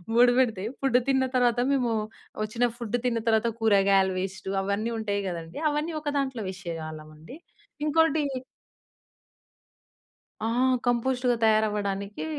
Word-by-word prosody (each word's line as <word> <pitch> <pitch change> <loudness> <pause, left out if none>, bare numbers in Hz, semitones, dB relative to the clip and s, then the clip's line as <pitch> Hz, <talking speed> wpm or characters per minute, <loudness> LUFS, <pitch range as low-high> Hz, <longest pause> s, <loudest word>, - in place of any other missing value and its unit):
Board 245 0 +6
పెడితే 220 -6 +1 0.2
food 260 -2 +3
తిన్న 265 -1 +3
తర్వాత 245 -1 +3
మేము, 245 -4 +1 0.5
వచ్చిన 230 +3 0
ఫుడ్ 235 0 -1
తిన్న 235 -2 +1
తర్వాత 220 +1 +3
కూరగాయల 195 -3 +4
వేస్ట్ 190 0 -5
అవన్నీ 200 +4 -1
ఉంటాయి 205 -2 -1
కదండీ! 170 - -6
అవన్నీ 305 +3 -2
ఒక 300 - -10
దాంట్లో 265 -5 -2
వేసేవాళ్ళం 160 -4 -7
అండి. 165 - -11 0.5
ఇంకోటి 315 0 +3 2.2
ఆ! 220 - 0 0.4
కంపోస్ట్‌గా 245 +1 +1
తయారవ్వడానికి, 210 -1 0
220 Hz, 115 wpm, -27 LUFS, 195-250 Hz, 2.2 s, Board